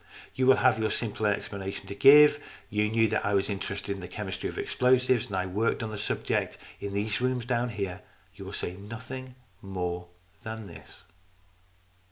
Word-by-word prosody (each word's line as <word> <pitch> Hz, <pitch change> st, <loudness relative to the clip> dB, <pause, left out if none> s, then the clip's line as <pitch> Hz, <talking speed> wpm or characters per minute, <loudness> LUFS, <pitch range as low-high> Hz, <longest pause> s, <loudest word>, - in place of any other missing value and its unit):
You 130 Hz, 0 st, +1 dB
will 130 Hz, -, +8 dB
have 125 Hz, -4 st, +3 dB
your 110 Hz, 0 st, +1 dB
simple 110 Hz, -2 st, -1 dB
explanation 100 Hz, -1 st, -3 dB
to -, -, -6 dB
give. 145 Hz, +6 st, +7 dB, 0.3 s
You 105 Hz, 0 st, +1 dB
knew 110 Hz, 0 st, +3 dB
that 110 Hz, -, 0 dB
I 100 Hz, 0 st, +1 dB
was 100 Hz, +1 st, +1 dB
interested 100 Hz, 0 st, -3 dB
in 100 Hz, -, -8 dB
the 90 Hz, -, -6 dB
chemistry 95 Hz, +1 st, -4 dB
of -, -, -8 dB
explosives, 125 Hz, -1 st, +2 dB
and 100 Hz, -, -5 dB
that 95 Hz, 0 st, 0 dB
1 -, -, -10 dB
worked 115 Hz, +3 st, +1 dB
at 110 Hz, -, -3 dB
the 105 Hz, -, -5 dB
subject -, -, -1 dB, 0.2 s
in 100 Hz, 0 st, -5 dB
those 105 Hz, +2 st, 0 dB
rooms 125 Hz, -1 st, 0 dB
down 120 Hz, -1 st, 0 dB
there. 95 Hz, -1 st, -3 dB, 0.3 s
You 100 Hz, 0 st, -10 dB
will 95 Hz, -, -8 dB
say 90 Hz, -, -3 dB
nothing 125 Hz, +6 st, -8 dB, 0.3 s
more 90 Hz, -2 st, -4 dB, 0.3 s
than 110 Hz, -2 st, -6 dB
this." 100 Hz, -, -13 dB
105 Hz, 190 wpm, -28 LUFS, 100-125 Hz, 0.3 s, will